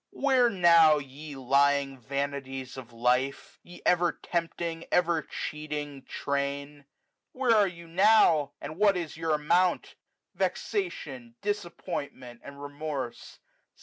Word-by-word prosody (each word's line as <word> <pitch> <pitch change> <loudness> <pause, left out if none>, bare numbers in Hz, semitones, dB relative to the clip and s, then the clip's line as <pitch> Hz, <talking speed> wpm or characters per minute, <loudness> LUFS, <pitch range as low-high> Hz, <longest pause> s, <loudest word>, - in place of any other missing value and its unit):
Where 260 -3 +3
now, 170 -6 +6
ye 145 +1 -8
lying 140 +1 +2
vanities 135 0 -4
of 125 -3 -9
life! 125 +3 0
Ye 175 0 -14
ever 175 -1 +3
tempting 170 -1 -3
ever 170 -2 +2
cheating 150 -2 -6
train! 140 +1 -3
2 - - -19
to - - -40 0.5
Where 255 -3 +3
are 205 -2 +5
you 170 -2 -9
now? 170 -5 +4
and 155 +3 -7
what 200 -1 +4
is 165 -4 -5
your 160 -1 0
amount? 170 +4 +1 0.4
Vexation, 135 - -3
disappointment, 170 - -5
and 140 0 -11
remorse. 145 -3 -6
150 Hz, 120 wpm, -28 LUFS, 140-175 Hz, 0.5 s, now